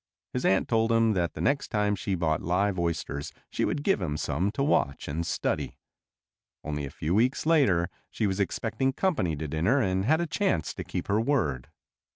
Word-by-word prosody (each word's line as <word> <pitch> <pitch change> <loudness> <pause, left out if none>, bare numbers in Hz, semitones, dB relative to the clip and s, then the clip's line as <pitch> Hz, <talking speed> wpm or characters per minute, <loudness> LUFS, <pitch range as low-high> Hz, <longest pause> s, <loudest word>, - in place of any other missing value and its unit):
His 125 - -2
aunt 95 - +3
told 115 0 +2
him 115 -1 +4
that 85 -3 0
the - - -5
next 140 0 +1
time 105 -2 +1
she 95 0 -2
bought 80 -3 0
live 95 +2 +1
oysters 80 -4 -2 0.2
she - - 0
would 145 - -2
give 195 - +2
him 75 -4 -2
some 90 +6 0
to 140 - 0
watch 70 - +1
and 80 +4 -2
study. - - -2 0.9
Only 75 -1 -3
a - - -6
few 80 +5 -3
weeks 120 +8 +2
later 130 - +4 0.2
she 110 - -1
was 95 -1 -1
expecting 115 +7 0
company 130 - 0
to 75 +1 -4
dinner 85 - +2
and 95 -5 +1
had 155 +6 +3
a 170 - 0
chance 170 - 0
to - - -6
keep - - -4
her 105 +2 +2
word. 90 - 0
100 Hz, 195 wpm, -28 LUFS, 85-125 Hz, 0.9 s, him